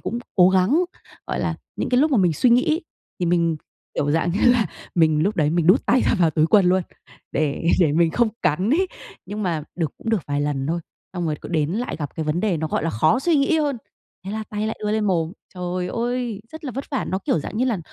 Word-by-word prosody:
cũng 235 - -3 0.2
cố 180 -1 +7
gắng, 195 - +3 0.4
gọi - - -2
là, - - -1 0.2
những - - -2
cái 250 0 +3
lúc 310 +2 +3
mà 270 - +3
mình 180 -3 +3
suy 240 - +2
nghĩ 265 +8 +3 0.4
thì 175 - +1
mình, 170 -2 +2 0.4
kiểu 145 - 0
dạng 165 +3 +1
như 195 - -1
là, 230 -5 +2 0.3
mình 155 -3 +3
lúc 205 +5 0
đấy 150 -2 +2
mình 170 0 +1
đút 185 +7 +4
tay 260 - +4
ra - - +3
vào 165 -3 +4
túi 155 +1 +2
quần 200 0 +5
luôn 185 +1 +3 0.5
để 145 0 -1 0.2
để 155 -4 +4
mình 165 +1 +3
không 235 +6 +2
cắn 185 +10 +1
ấy. 370 +6 +3 0.4
Nhưng 210 +1 -4
mà 165 -5 -1
được 160 -5 -2
cũng 225 - -4
được 220 -5 +2
vài 145 0 -1
lần 145 -2 -1
thôi, 170 +3 -1 0.3
xong 175 -2 -2
rồi 150 -1 -1
cứ - - -8
đến 155 -2 0
lại 240 +5 -3
gặp 145 -2 -5
cái 160 - -2
vấn 155 +3 0
đề 200 -6 +1
nó, 160 - -2
gọi 150 - -1
là, 165 - 0
khó 155 - +2
suy 330 +1 +2
nghĩ 285 +4 +3
hơn, 285 -4 0 0.5
thế 195 - -5
là 220 0 -3
tay 210 0 -2
lại 220 - -4
đưa 210 - 0
lên 215 -1 +1
mồm. 165 -3 0 0.2
Trời 180 0 -3
ơi, 240 -2 -2
rất 315 0 -9
là 265 - -3
vất 270 +3 -4
vả! 270 - -1
Nó, 190 - -2
kiểu 180 - 0
dạng 215 - -6
như 250 - +2
là, 235 -7 0
180 Hz, 260 wpm, -22 LUFS, 160-235 Hz, 0.5 s, cố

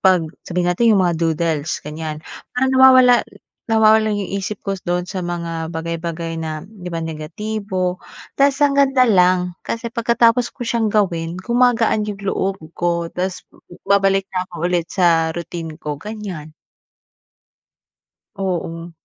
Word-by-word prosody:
'pag, 185 -3 +4 0.2
sabihin 180 0 0
natin 230 +6 +2
yung 190 - +3
mga 175 - +2
doodles, 160 -2 0
ganyan, 155 0 -5 0.4
parang 265 +1 +2
nawawala 255 -1 +7 0.5
nawawala 220 0 +5
yung 205 -2 -2
isip 200 +1 -3
ko 195 - 0
dun 175 0 -1
sa 190 0 -4
mga 170 -2 -4
bagay-bagay 165 0 -4
na 155 -1 -5
'di 190 -4 -10
ba 165 - -3
negatibo. 185 +3 -3 0.3
Tapos 275 0 +3
ang 280 -1 +2
ganda 270 -2 +4
lang, 180 -3 +3
kasi 230 0 -4
pagkatapos 235 0 +3
ko 245 - -5
siyang 230 -2 0
gawin, 175 -5 0
gumagaan 235 0 +2
yung 205 -2 -5
loob 195 0 -1 0.2
ko. 170 -1 -1
Tapos 185 +1 -3 0.4
babalik 195 -1 +3
na 185 -1 0
ako 180 - -14 0.2
ulit 170 -2 0
sa 165 -3 +3
routine 165 -2 -6
ko, 150 -3 -5
ganyan. 200 -8 -7 1.9
Oo. 175 -3 -3
185 Hz, 140 wpm, -19 LUFS, 170-220 Hz, 1.9 s, nawawala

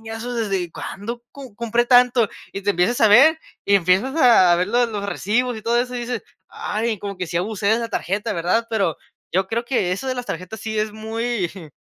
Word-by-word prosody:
y, 225 - -12
¿eso 235 +2 -5
desde 195 -7 -2
cuándo 235 +4 -6
com 265 -6 -11
compré 235 +2 0
tanto?", 245 -3 +5 0.2
y 195 - -6
te 205 - +2
empiezas 195 +6 +1
a 220 - +6
ver 275 +10 +7 0.3
y 200 - +4
empiezas 195 - +1
a 205 - +6
ver 180 +1 0
lo 240 +2 +3
los 205 -3 -4
recibos 225 +5 -1
y 215 - -9
todo 235 +1 +1
eso, 250 0 -4
y 245 - -3
dices: 240 -1 -4 0.3
"Ay, 220 0 -3
como 200 0 -6
que 180 -2 -4
sí 170 - -3
abusé 200 +3 -2
de 220 +1 +3
la 230 - -3
tarjeta", 205 -1 -2
¿verdad?, 185 +7 0
pero, 195 -8 0 0.4
yo 190 +2 +1
creo 235 +1 -2
que 215 -8 0
eso 230 +8 -4
de 255 - -1
las 245 -1 -4
tarjetas, 185 +5 -6
sí 220 -1 -3
es 215 0 -1
muy, 220 -2 -2
jum, 175 -6 -11
220 Hz, 230 wpm, -21 LUFS, 195-240 Hz, 0.4 s, ver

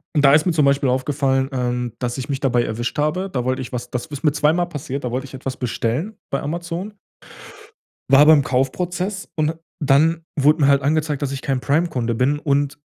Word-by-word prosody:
Da 145 -2 +5
ist 150 +1 +4
mir 175 - +2
zum 150 -3 +3
Beispiel 140 -1 +2
aufgefallen, 135 0 0
ähm, 125 -2 -2
dass 120 0 -3
ich 130 +2 -5
mich 135 -2 -2
dabei 125 -3 +2
erwischt 120 +2 -3
habe. 175 +6 0
Da 125 -9 -3
wollte 130 +1 -1
ich 125 - -7
was 125 -1 -5
das 125 +4 -3
ist 145 -3 -8
mir 150 - +4
zweimal 155 +4 +1
passiert, 140 -4 -5
da 125 - -3
wollt 130 +2 -2
ich 135 -1 -10
etwas 130 0 -5
bestellen 125 - -2
bei 140 - -1
Amazon 170 +6 -5 1.1
war 140 +2 +8
beim 155 -1 +7
Kaufprozess 180 +10 -2
und 155 -1 +1
d - - -2 0.3
dann 155 +4 +3
wurde 150 +3 +4
mir 140 - +5
halt 140 -1 +4
angezeigt, 150 +1 0
dass 140 -2 -2
ich 135 -1 -5
kein 135 -2 -1
Prime-Kunde 140 -6 0
bin 130 +5 +1
und 145 0 0
140 Hz, 210 wpm, -21 LUFS, 130-155 Hz, 1.1 s, war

